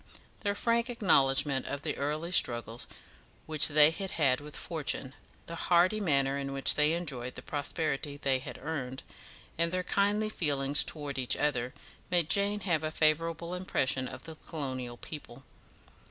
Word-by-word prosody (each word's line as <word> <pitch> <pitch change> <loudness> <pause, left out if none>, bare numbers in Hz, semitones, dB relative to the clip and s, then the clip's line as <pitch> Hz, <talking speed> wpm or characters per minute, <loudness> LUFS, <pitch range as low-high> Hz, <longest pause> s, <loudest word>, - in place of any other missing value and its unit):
Their 205 -1 -1
frank 235 +3 +1
acknowledgment 140 - +2
of 140 0 -4
the - - -2
early 150 +4 -2
struggles 120 -7 +1 0.6
which 155 -2 +6
they 150 0 +6
had 195 +3 -5
had 140 -6 +2
with 150 0 -9
fortune, 145 -5 -3 0.3
the 170 - -7 0.2
hearty 180 +4 +4
manner 140 -7 +1
in 135 0 -4
which 135 0 +4
they 150 +1 +2
enjoyed 135 -8 -3
the - - -8
prosperity 145 0 -2
they 135 -2 +1
had 125 -2 -8
earned, 135 -4 -4 0.6
and 170 0 +2
their 185 0 -1
kindly 205 +3 +1
feeling 145 -8 0
towards 145 -2 +1
each 125 - +1
other, 130 -4 -1 0.3
made 175 -4 +2
Jane 205 +1 +2
have 170 -5 0
a 155 - 0
favourable 165 +2 +1
impression 130 -8 0
of - - -9 0.2
colonial 130 -6 -5
people. 135 -3 -9
150 Hz, 155 wpm, -30 LUFS, 135-170 Hz, 0.6 s, which